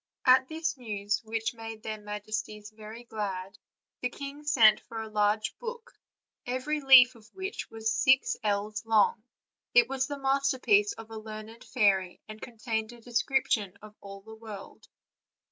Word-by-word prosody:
At 260 Hz, 0 st, +6 dB
this 320 Hz, -1 st, -3 dB
news, 210 Hz, -4 st, -2 dB
which 225 Hz, +1 st, -2 dB
made 225 Hz, -1 st, -9 dB
their 215 Hz, -1 st, -5 dB
majesties 210 Hz, 0 st, -5 dB
very 215 Hz, +2 st, -10 dB
glad, 200 Hz, -4 st, -5 dB, 0.4 s
the 250 Hz, -, 0 dB
king 280 Hz, +3 st, -8 dB
sent 225 Hz, -7 st, +6 dB
for 225 Hz, -, -8 dB
a 220 Hz, -, -5 dB
large 210 Hz, 0 st, 0 dB
book, 470 Hz, -1 st, -7 dB, 0.5 s
every 265 Hz, +5 st, -2 dB
leaf 260 Hz, -2 st, +8 dB
of 225 Hz, -2 st, -18 dB
which 385 Hz, +1 st, -5 dB
was 225 Hz, 0 st, -2 dB
six 265 Hz, +3 st, +3 dB
ells 210 Hz, +1 st, -1 dB
long; 220 Hz, -1 st, +3 dB, 0.5 s
it 485 Hz, -1 st, +7 dB
was 270 Hz, 0 st, -1 dB
the 285 Hz, -, -5 dB
masterpiece 270 Hz, -7 st, +2 dB
of 225 Hz, 0 st, -12 dB
a 220 Hz, -, -6 dB
learned 215 Hz, +1 st, -9 dB
fairy, 195 Hz, -6 st, +1 dB
and 215 Hz, 0 st, -10 dB
contained 220 Hz, -1 st, -4 dB
a 240 Hz, -, -14 dB
description 230 Hz, -4 st, 0 dB
of 210 Hz, 0 st, -12 dB
all 200 Hz, 0 st, -10 dB
the 220 Hz, +2 st, -12 dB
world. 220 Hz, -3 st, -11 dB
220 Hz, 155 wpm, -29 LUFS, 210-255 Hz, 0.5 s, leaf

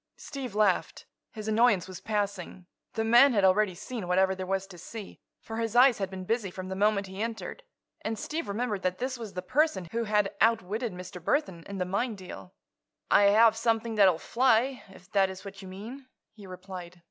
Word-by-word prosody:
Steve 265 Hz, -7 st, -7 dB
laughed. 210 Hz, -4 st, +1 dB, 0.3 s
His 215 Hz, -1 st, -7 dB
annoyance 215 Hz, -4 st, +3 dB
was 185 Hz, -1 st, -8 dB
passing. 200 Hz, -4 st, -3 dB, 0.3 s
The 220 Hz, -, -1 dB
man 240 Hz, +4 st, +6 dB
had 200 Hz, -3 st, +2 dB
already 190 Hz, 0 st, +3 dB
seen 210 Hz, +1 st, -6 dB
whatever 190 Hz, +1 st, +3 dB
there 185 Hz, -1 st, -6 dB
was 195 Hz, 0 st, -1 dB
to 185 Hz, -3 st, -13 dB
see, 220 Hz, +1 st, -9 dB, 0.2 s
for 225 Hz, -, -7 dB
his 225 Hz, 0 st, -2 dB
eyes 250 Hz, -2 st, +6 dB
had 195 Hz, -, -2 dB
been 190 Hz, -1 st, -7 dB
busy 225 Hz, -1 st, -1 dB
from 185 Hz, +1 st, -7 dB
the 190 Hz, -, -3 dB
moment 200 Hz, 0 st, +2 dB
he 190 Hz, +1 st, -7 dB
entered. 230 Hz, -, -4 dB, 0.4 s
And 220 Hz, 0 st, -3 dB
Steve 315 Hz, +9 st, -4 dB
remembered 210 Hz, -1 st, -2 dB
that 185 Hz, 0 st, -1 dB
this 255 Hz, +2 st, -3 dB
was 220 Hz, -4 st, -7 dB
the 180 Hz, -1 st, -5 dB
person 255 Hz, -, +1 dB
who 230 Hz, 0 st, -1 dB
had 210 Hz, -2 st, +1 dB
outwitted 225 Hz, +1 st, +1 dB
Mr. 180 Hz, -1 st, -9 dB
Burthon 185 Hz, -, 0 dB
in 200 Hz, -, -5 dB
the 180 Hz, -, -1 dB
mine 210 Hz, +5 st, -1 dB
deal. 185 Hz, -1 st, -10 dB, 0.6 s
"I 205 Hz, -, +6 dB
have 220 Hz, +2 st, +6 dB
something 225 Hz, 0 st, 0 dB
that 205 Hz, -3 st, +6 dB
will 170 Hz, -, 0 dB
fly, 250 Hz, +4 st, +2 dB
if 180 Hz, -1 st, -16 dB
that 195 Hz, -2 st, +3 dB
is 190 Hz, +1 st, -9 dB
what 195 Hz, 0 st, -9 dB
you 190 Hz, -, -10 dB
mean," 225 Hz, +8 st, -9 dB, 0.3 s
he 210 Hz, -3 st, -13 dB
replied. 180 Hz, -1 st, -9 dB
205 Hz, 205 wpm, -28 LUFS, 190-230 Hz, 0.6 s, man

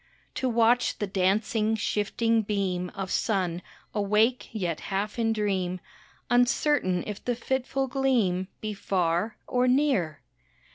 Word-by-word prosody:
To 260 Hz, -, -1 dB
watch 235 Hz, +1 st, +3 dB
the 205 Hz, -, -1 dB
dancing, 210 Hz, +3 st, +1 dB
shifting 225 Hz, +2 st, +1 dB
beam 190 Hz, -4 st, -1 dB
Of 195 Hz, -2 st, -4 dB
sun, 180 Hz, -5 st, 0 dB, 0.3 s
awake 215 Hz, +4 st, +2 dB
yet 180 Hz, -7 st, -2 dB
half 205 Hz, +4 st, -2 dB
in 225 Hz, -1 st, +2 dB
dream, 190 Hz, -4 st, -1 dB, 0.5 s
Uncertain 245 Hz, -, +2 dB
if 210 Hz, -2 st, -6 dB
the 245 Hz, -, 0 dB
fitful 265 Hz, +2 st, -1 dB
gleam 245 Hz, -9 st, +1 dB
Be 215 Hz, -1 st, -3 dB
far 185 Hz, +1 st, 0 dB
or 250 Hz, 0 st, +1 dB
near. 250 Hz, -, +2 dB
210 Hz, 125 wpm, -27 LUFS, 190-240 Hz, 0.5 s, watch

